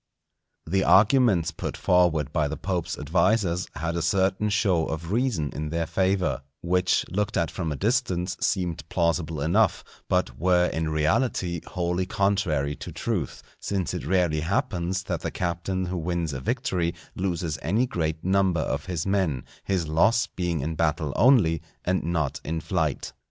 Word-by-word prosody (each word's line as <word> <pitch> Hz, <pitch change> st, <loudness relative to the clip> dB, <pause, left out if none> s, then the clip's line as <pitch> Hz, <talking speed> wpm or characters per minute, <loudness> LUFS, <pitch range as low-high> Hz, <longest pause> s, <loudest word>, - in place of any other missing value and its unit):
The 95 Hz, +4 st, +1 dB
arguments 105 Hz, -5 st, +4 dB
put -, -, -5 dB
forward 85 Hz, -6 st, +2 dB
by 75 Hz, -2 st, +2 dB
the 80 Hz, -, -4 dB
Pope's 90 Hz, -3 st, -2 dB
advisers 95 Hz, -4 st, +1 dB
had 80 Hz, +3 st, -2 dB
a 85 Hz, -, -1 dB
certain 95 Hz, +4 st, +1 dB
show 100 Hz, -6 st, +2 dB
of 80 Hz, +2 st, -4 dB
reason 110 Hz, -, 0 dB
in 75 Hz, 0 st, -4 dB
their 85 Hz, +1 st, -1 dB
favour, 95 Hz, -5 st, 0 dB, 0.2 s
which 90 Hz, +1 st, +2 dB
looked 105 Hz, +3 st, -1 dB
at 85 Hz, -, 0 dB
from 85 Hz, -4 st, -3 dB
a -, -, -2 dB
distance 95 Hz, -, 0 dB
seemed 90 Hz, -4 st, 0 dB
plausible 85 Hz, -2 st, 0 dB
enough; 95 Hz, +10 st, +2 dB, 0.3 s
but -, -, 0 dB
were 90 Hz, +1 st, +4 dB
in 80 Hz, -1 st, -2 dB
reality 85 Hz, -, 0 dB
wholly 90 Hz, +1 st, -1 dB
contrary 90 Hz, -9 st, 0 dB
to 90 Hz, -, -7 dB
truth; 85 Hz, -, -3 dB, 0.2 s
since 95 Hz, -4 st, -2 dB
it -, -, -4 dB
rarely 90 Hz, -5 st, +2 dB
happens 90 Hz, +2 st, -1 dB
that -, -, -3 dB
the -, -, -2 dB
captain 90 Hz, +1 st, -2 dB
who 90 Hz, 0 st, -3 dB
wins 85 Hz, -2 st, -2 dB
a 65 Hz, -, -3 dB
victory 90 Hz, -, -1 dB, 0.2 s
loses 85 Hz, -5 st, -2 dB
any 105 Hz, +10 st, +1 dB
great 80 Hz, -8 st, -2 dB
number 95 Hz, -3 st, +2 dB
of -, -, -2 dB
his 85 Hz, -4 st, -2 dB
men, 95 Hz, -10 st, 0 dB, 0.2 s
his 95 Hz, -5 st, 0 dB
loss 110 Hz, +9 st, +3 dB
being 90 Hz, -7 st, -2 dB
in 80 Hz, +4 st, -2 dB
battle 80 Hz, -2 st, 0 dB
only, 105 Hz, -, +4 dB, 0.2 s
and 95 Hz, +1 st, +1 dB
not 80 Hz, -4 st, -1 dB
in 80 Hz, +2 st, -2 dB
flight. 80 Hz, -5 st, -2 dB
90 Hz, 160 wpm, -26 LUFS, 80-95 Hz, 0.3 s, arguments